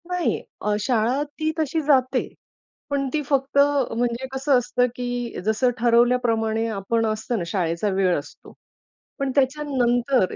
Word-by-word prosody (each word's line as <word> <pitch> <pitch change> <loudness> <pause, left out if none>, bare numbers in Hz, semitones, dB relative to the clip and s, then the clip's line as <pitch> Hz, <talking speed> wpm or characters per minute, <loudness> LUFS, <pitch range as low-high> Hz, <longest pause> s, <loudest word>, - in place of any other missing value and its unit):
नाही 360 -1 0 0.2
अ, 210 0 0
शाळा 240 +4 +1 0.2
ती 315 0 0
तशी 315 +1 0
जाते. 260 -3 +3 0.6
पण 280 -1 0
ती 305 - +1
फक्त 275 -1 0 0.4
म्हणजे 240 +1 -1
कसं 265 0 +2
असतं, 245 0 +1
की 245 -4 -4
जसं 220 +4 +2
ठरवल्याप्रमाणे 235 -2 +2
आपण 225 +2 -1
असतो 220 +2 -2
ना, 195 - -1
शाळेचा 170 +2 -1
वेळ 190 -2 +2
असतो. 145 - -14 0.7
पण 275 -1 -1
त्याच्यानंतर 260 -5 +1
245 Hz, 135 wpm, -23 LUFS, 220-270 Hz, 0.7 s, जाते